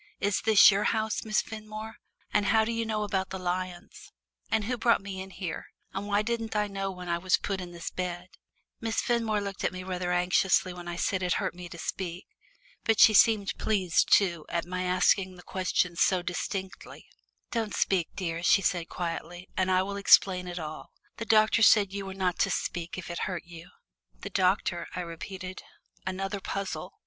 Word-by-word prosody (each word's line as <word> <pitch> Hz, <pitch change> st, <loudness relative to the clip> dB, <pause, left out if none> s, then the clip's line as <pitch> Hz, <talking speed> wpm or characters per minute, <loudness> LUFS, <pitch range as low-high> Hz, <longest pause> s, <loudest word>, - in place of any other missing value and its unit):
Is 200 Hz, 0 st, 0 dB
this 215 Hz, -1 st, +7 dB
your 200 Hz, +2 st, 0 dB
house, 220 Hz, -1 st, 0 dB
Miss 215 Hz, -1 st, +1 dB
Fenmore, 215 Hz, 0 st, -8 dB, 0.4 s
and 205 Hz, -1 st, +2 dB
how 220 Hz, +1 st, +4 dB
do 230 Hz, -, -2 dB
you 230 Hz, -1 st, -2 dB
know 215 Hz, -1 st, -1 dB
about 195 Hz, -2 st, -1 dB
the 190 Hz, -, -4 dB
lions? 185 Hz, -, -5 dB, 0.4 s
And 220 Hz, -1 st, +1 dB
who 250 Hz, +4 st, -1 dB
brought 235 Hz, -3 st, +2 dB
me 195 Hz, -1 st, -6 dB
in 190 Hz, -, -8 dB
here, 185 Hz, -3 st, -6 dB, 0.3 s
and 195 Hz, +2 st, -4 dB
why 205 Hz, +1 st, +2 dB
didn't 225 Hz, -1 st, -3 dB
I 210 Hz, 0 st, +2 dB
know 195 Hz, -1 st, -3 dB
when 180 Hz, -1 st, -8 dB
I 170 Hz, 0 st, 0 dB
was 185 Hz, +1 st, +3 dB
put 195 Hz, -2 st, -3 dB
in 175 Hz, -1 st, -7 dB
this 170 Hz, -1 st, -6 dB
bed?" 180 Hz, 0 st, -4 dB, 0.5 s
Miss 225 Hz, 0 st, -1 dB
Fenmore 225 Hz, -3 st, +1 dB
looked 200 Hz, -1 st, -5 dB
at -, -, +1 dB
me 185 Hz, 0 st, -7 dB
rather 180 Hz, -1 st, -3 dB
anxiously 180 Hz, +1 st, +2 dB
when 175 Hz, -1 st, -9 dB
I 175 Hz, -, -4 dB
said 190 Hz, +2 st, 0 dB
it 180 Hz, -2 st, +1 dB
hurt -, -, -1 dB
me 175 Hz, 0 st, -9 dB
to 170 Hz, -, -9 dB
speak. 175 Hz, +1 st, -5 dB, 0.6 s
But 225 Hz, -1 st, +2 dB
she 220 Hz, -, +8 dB
seemed 210 Hz, -1 st, +4 dB
pleased, 190 Hz, -5 st, +1 dB
too, 170 Hz, -6 st, +4 dB
at 170 Hz, -1 st, -1 dB
my 180 Hz, +1 st, -3 dB
asking 185 Hz, +1 st, +2 dB
the 180 Hz, -, -14 dB
questions 180 Hz, -2 st, -1 dB
so 185 Hz, -2 st, +3 dB
distinctly. 190 Hz, +2 st, -5 dB, 0.5 s
"Don't 225 Hz, -3 st, -2 dB
speak, 180 Hz, -4 st, +1 dB
dear," 170 Hz, -3 st, -3 dB
she 195 Hz, +3 st, +4 dB
said 175 Hz, -1 st, 0 dB
quietly, 175 Hz, +1 st, -5 dB
"and 185 Hz, 0 st, +1 dB
I 185 Hz, 0 st, +3 dB
will 200 Hz, +1 st, -4 dB
explain 185 Hz, -2 st, +5 dB
it 175 Hz, 0 st, -5 dB
all. 155 Hz, -2 st, -6 dB, 0.3 s
The 230 Hz, -, -4 dB
doctor 215 Hz, +1 st, +4 dB
said 205 Hz, -3 st, +6 dB
you 200 Hz, -1 st, -4 dB
were 190 Hz, -, -6 dB
not 185 Hz, -2 st, -1 dB
to -, -, +3 dB
speak 170 Hz, 0 st, -3 dB
if 175 Hz, -1 st, -6 dB
it 170 Hz, -, -4 dB
hurt 180 Hz, -3 st, -4 dB
you." 170 Hz, 0 st, -12 dB, 0.5 s
"The 200 Hz, -, -6 dB
doctor," 185 Hz, -2 st, +1 dB
I 180 Hz, -, -2 dB
repeated. 185 Hz, +2 st, -7 dB, 0.5 s
Another 195 Hz, +1 st, -3 dB
puzzle! 195 Hz, -1 st, -4 dB
190 Hz, 195 wpm, -28 LUFS, 180-210 Hz, 0.6 s, she